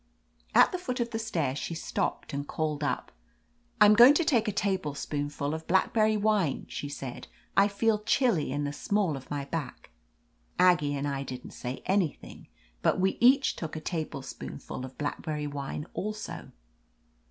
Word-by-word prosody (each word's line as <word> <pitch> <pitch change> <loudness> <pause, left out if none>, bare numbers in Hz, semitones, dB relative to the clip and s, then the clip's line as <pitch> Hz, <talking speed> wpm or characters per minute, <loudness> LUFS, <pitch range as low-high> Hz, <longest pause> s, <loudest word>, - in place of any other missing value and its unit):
At - - +7
the 365 - -3
foot 255 -7 -3
of 235 0 -1
the 225 - -2
stairs 155 -11 -1
she 165 - -4
stopped 160 - -3
and 140 +1 -3
called 155 -2 -2
up. 145 - -2 0.7
"I'm 210 0 +8
going 240 +6 +9
to 340 - +3
take 235 -7 +2
a - - +2
tablespoonful 150 -7 -2
of 160 0 -6
black 190 +2 +2
berry 215 -1 +3
wine," 205 -8 +1
she 145 - -5
said. 135 -3 -7 0.3
"I 195 +1 +6
feel 210 +1 +1
chilly 210 - +2
in 145 +2 -1
the 145 0 -2
small 195 -1 0
of 135 -1 -9
my 145 -1 -3
back." 150 - -5 0.7
Aggie 165 -6 +4
and 140 +1 -2
I 140 -1 -2
didn't 130 -2 -7
say 125 +1 -6
an3rthing, 190 -5 -1 0.3
but - - +2
we 190 +1 +1
each 265 +3 +5
took 160 -2 -5
a - - -3
tablespoonful 155 -6 -5
of 130 - -12
blackberry 150 +1 -3
wine 145 0 -4
also. 215 +1 -5
160 Hz, 165 wpm, -29 LUFS, 145-210 Hz, 0.7 s, going